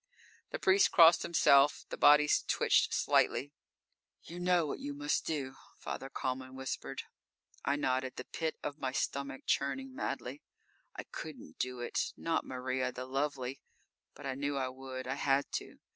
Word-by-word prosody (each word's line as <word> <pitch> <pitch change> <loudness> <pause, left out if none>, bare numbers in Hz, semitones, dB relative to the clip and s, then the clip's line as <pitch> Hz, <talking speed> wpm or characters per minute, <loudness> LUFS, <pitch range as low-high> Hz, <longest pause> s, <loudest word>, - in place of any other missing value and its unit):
The - - -3
priest 190 +1 +4
crossed 165 -1 +7
himself. 145 -3 +4
The - - -4
bodies 150 0 +5
twitched - - +3
slightly. 145 +2 +2 0.7
"You 175 +2 -8
know 175 -2 +3
what 145 - -4
you 145 0 -5
must 145 +1 -1
do," 140 -4 -2 0.2
Father 135 - -6
Kalman 130 0 -4
whispered. 130 -1 -5 0.6
I 140 - +2
nodded, 130 -2 -1
the - - -5
pit 160 -1 -3
of 145 +1 -4
my 130 -1 -2
stomach 140 -1 -2
churning 260 - -1
madly. 140 - -4 0.5
I - - -5
couldn't 80 - -9
do 125 -1 -2
it! 120 - -2
Not 165 -1 -1
Maria, 130 0 -2
the 125 +1 -6
lovely. 135 -1 -2 0.5
But 145 - -11
I 135 - -1
knew 140 +1 -2
I 130 -1 -1
would; 130 0 -7
I 130 - -2
had 140 0 +1
to. - - -10
140 Hz, 160 wpm, -33 LUFS, 130-150 Hz, 0.7 s, crossed